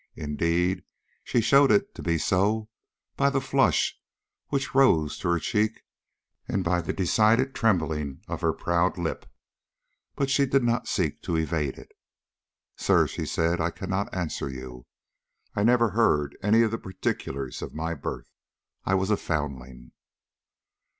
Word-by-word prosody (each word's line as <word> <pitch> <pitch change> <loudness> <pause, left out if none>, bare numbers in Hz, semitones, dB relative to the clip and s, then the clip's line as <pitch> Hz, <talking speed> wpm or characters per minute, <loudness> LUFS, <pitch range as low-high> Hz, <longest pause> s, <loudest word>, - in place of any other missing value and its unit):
Indeed, 85 +5 0 0.4
she 120 - +1
showed 135 +4 +5
it 205 +1 +2
to - - -9
be 85 -1 0
so 105 +6 +1 0.5
by 140 0 +3
the 140 -1 +1
flush 135 +1 +1 0.5
which 140 -1 -2
rose 85 - +4
to 85 - -2
her 85 - +3
cheek 105 +5 -1 0.6
and 95 - -1
by 90 0 +1
the - - -3
decided 110 +7 +2
trembling 80 - 0
of - - -5
her - - +2
proud 85 +2 0
lip. 85 -2 -3 0.9
But 135 -1 -1
she 140 0 +3
did 135 0 +2
not 120 0 0
seek 80 -7 -1
to 85 - -2
evade 80 -3 -1
it. - - -13 0.8
"Sir," - - +3
she - - -5
said, 85 +1 0
"I 85 - +1
cannot 95 +3 -3
answer 85 -6 -3
you. 65 -2 -9 0.7
I - - 0
never 115 0 +4
heard 75 -10 +2
any 110 +3 +4
of 110 - +1
the 115 - -3
particulars 70 -8 -4
of - - -7
my 80 +2 -2
birth. - - -6 0.5
I 95 - +1
was 95 +2 0
a 105 - +3
foundling." 65 -6 -4
90 Hz, 150 wpm, -26 LUFS, 80-115 Hz, 0.9 s, showed